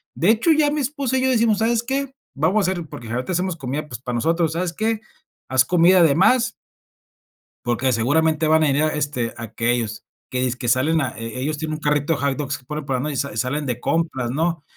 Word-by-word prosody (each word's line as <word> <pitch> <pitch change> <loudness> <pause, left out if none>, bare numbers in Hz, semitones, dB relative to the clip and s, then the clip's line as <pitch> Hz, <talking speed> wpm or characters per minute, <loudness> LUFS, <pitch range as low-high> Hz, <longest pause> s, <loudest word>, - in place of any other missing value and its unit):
De 175 - +2
hecho, 235 +9 +3
ya 300 -2 +3
mi 300 -1 -1
esposa 270 -1 -1
y - - -1
yo 260 - +3
decimos: 225 -4 +2
"¿Sabes 230 +1 +1
qué?, 270 +2 -2 0.2
vamos 185 +7 +1
a - - +1
hacer", 175 -4 -4
porque 115 -4 -9
generalmente 125 +10 -3
hacemos 180 0 -1
comida, 140 +3 -4
pues, 120 -5 -7
para 125 -2 -4
nosotros, 165 +5 +1
"¿Sabes 175 0 -1
qué?, 220 +1 -1 0.5
haz 130 0 +4
comida 180 +2 +5
de 140 -4 +4
más" 235 +6 +3 1.1
"porque 120 +2 +1
seguramente 155 +7 +2
van 160 0 +4
a 155 - +3
venir, 140 +2 +2
este, 145 -6 -2
aquellos". 115 -1 -2 0.2
Que 125 - -2
dizque 125 -1 -2
salen 150 +7 +2
a - - -1
eh, 115 +2 -6
ellos 150 +3 -2
tienen 155 0 -3
un - - -7
carrito 150 +1 +1
de 145 - -3
hot 140 -1 0
dogs, 140 -2 -4
por 150 -1 -5
por 135 -2 -1
ejemplo, 140 +4 -2
y - - -5
sa 140 -4 -2
salen 135 +5 -1
de 125 -2 -2
compras, 155 -6 -1
¿no?, 165 +2 -1
155 Hz, 220 wpm, -22 LUFS, 130-185 Hz, 1.1 s, comida